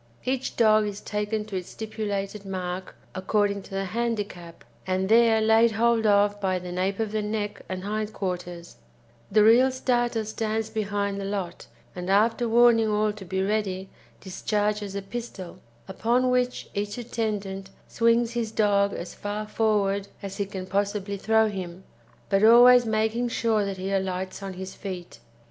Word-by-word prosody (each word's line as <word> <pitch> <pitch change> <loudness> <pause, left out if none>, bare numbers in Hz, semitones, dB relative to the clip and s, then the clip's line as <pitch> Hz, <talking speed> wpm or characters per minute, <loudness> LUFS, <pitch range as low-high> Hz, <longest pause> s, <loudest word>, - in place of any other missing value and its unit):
Each 260 0 -2
dog 215 -2 +4
is 205 0 -5
taken 210 +1 -3
to 210 -2 -7
its 180 -1 -4
stipulated 210 -2 -4
mark 185 -1 -5 0.2
according 200 +1 0
to - - -15
the 195 0 -3
handicap, 205 -6 -4 0.2
and 185 +1 0
there 225 0 +5
laid 220 +1 +4
hold 230 0 +2
of 205 0 +3
by 190 -1 +1
the 180 0 -7
nape 185 +2 -1
of 220 -2 -1
the 215 0 -1
neck 210 0 -3
and 185 0 -4
hind 215 +1 -2
quarters; 180 -3 -5 0.5
the 210 +1 +5
real 240 +4 +6
starter 240 -3 0
stands 220 0 -2
behind 200 -2 -2
the - - -4
lot, 195 -3 -4 0.3
and 180 0 -5
after 225 +4 +2
warning 230 -1 +5
all 210 0 +1
to 205 -2 -10
be 190 +1 -2
ready, 195 -2 -2 0.3
discharges 205 +1 -2
a 200 - -3
pistol, 195 -4 -7 0.3
upon 240 +6 +1
which 250 0 0
each 205 +1 -3
attendant 205 -5 -3 0.2
swings 230 0 +2
his 230 -2 -2
dog 200 -2 +2
as 175 - -6
far 210 +1 -5
forward 200 -2 +1 0.2
as 195 -1 -6
he 200 -2 -2
can 190 -2 -6
possibly 200 +1 -1
throw 220 +2 +3
him, 185 -3 -6 0.4
but 195 0 +2
always 240 +2 +8
making 220 +2 0
sure 225 -2 +1
that 195 -1 -4
he 190 +1 -4
alights 190 0 -2
on 195 -1 -5
his 190 +1 -7
feet. 185 -3 -7
205 Hz, 160 wpm, -26 LUFS, 195-220 Hz, 0.5 s, always